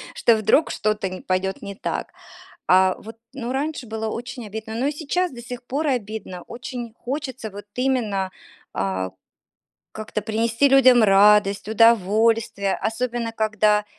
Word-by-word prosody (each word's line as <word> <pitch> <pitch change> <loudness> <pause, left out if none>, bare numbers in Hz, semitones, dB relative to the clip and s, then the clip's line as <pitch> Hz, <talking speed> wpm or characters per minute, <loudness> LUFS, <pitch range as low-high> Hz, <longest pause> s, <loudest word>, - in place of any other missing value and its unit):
что 235 - +4
вдруг 220 +9 +3
что-то 210 -2 -1
не 185 - -7
пойдет 190 +1 -1
не 200 -1 -7
так. - - -3 0.6
А 185 0 +5
вот, 225 +1 -11 0.2
ну, 245 -2 -4
раньше 280 -1 -3
было 220 0 -4
очень 240 +1 -6
обидно, 220 +1 -7
но 250 +4 -1
и 295 - +1
сейчас 340 +4 -1
до 240 - -9
сих 245 0 -7
пор 285 +5 -2
обидно. 215 -7 -3
Очень 240 -1 -7
хочется 260 -4 -5
вот 205 +1 -9
именно, 225 -8 0 0.4
а, 95 -1 -2 0.8
как-то 215 -1 -5
принести 230 +5 +1
людям 255 -3 +6
радость, 205 0 +5
удовольствие, 220 -1 +3
особенно 235 0 -2
когда 215 -1 +2
220 Hz, 140 wpm, -23 LUFS, 205-245 Hz, 0.8 s, людям